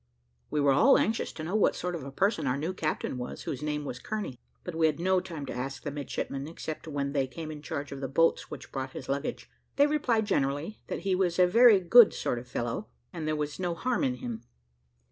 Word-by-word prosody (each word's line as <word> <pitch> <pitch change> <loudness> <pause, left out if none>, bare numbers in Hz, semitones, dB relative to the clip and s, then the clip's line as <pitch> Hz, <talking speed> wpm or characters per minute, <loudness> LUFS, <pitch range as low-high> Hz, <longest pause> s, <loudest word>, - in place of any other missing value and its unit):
We 150 - 0
were 140 -1 +4
all 270 - +6
anxious 225 +1 0
to 155 - -7
know 170 +4 -4
what 215 - +3
sort 180 0 -3
of 165 -5 -4
a 140 - -7
person 185 -1 +1
our 130 +1 +1
new 160 +6 -2
captain 155 -6 -2
was 125 - -6
whose 130 - -4
name 150 -1 -2
was 125 -3 -5
Kearney; 205 - -4 0.2
but 180 - -5
we 160 0 +3
had 155 0 -1
no 185 +1 +3
time 170 -6 -6
to - - -5
ask 135 +2 -5
the 145 - -3
midshipmen 140 -1 -4
except 160 0 -6
when 140 -2 -2
they 135 -2 +1
came 155 +4 -7
in 150 -1 -8
charge 145 -3 -5
of 140 0 -6
the 135 - -2
boats 165 +5 +2
which 150 - -9
brought 130 -1 -4
his 130 - -7
luggage: 140 +2 -3 0.3
they 285 - +6
replied 270 -7 +1
generally, 145 +1 -1
that - - -4
he 195 -1 0
was 180 -2 +1
a 180 - +7
very 230 +2 +7
good 215 +5 +7
sort 120 - -1
of 125 - -12
fellow, 120 - -3 0.3
and 160 -3 -4
there 155 - +1
was 150 +1 -3
no 175 -2 -1
harm 250 +8 0
in 130 -2 +1
him. 120 -2 -6
155 Hz, 240 wpm, -29 LUFS, 140-185 Hz, 0.3 s, a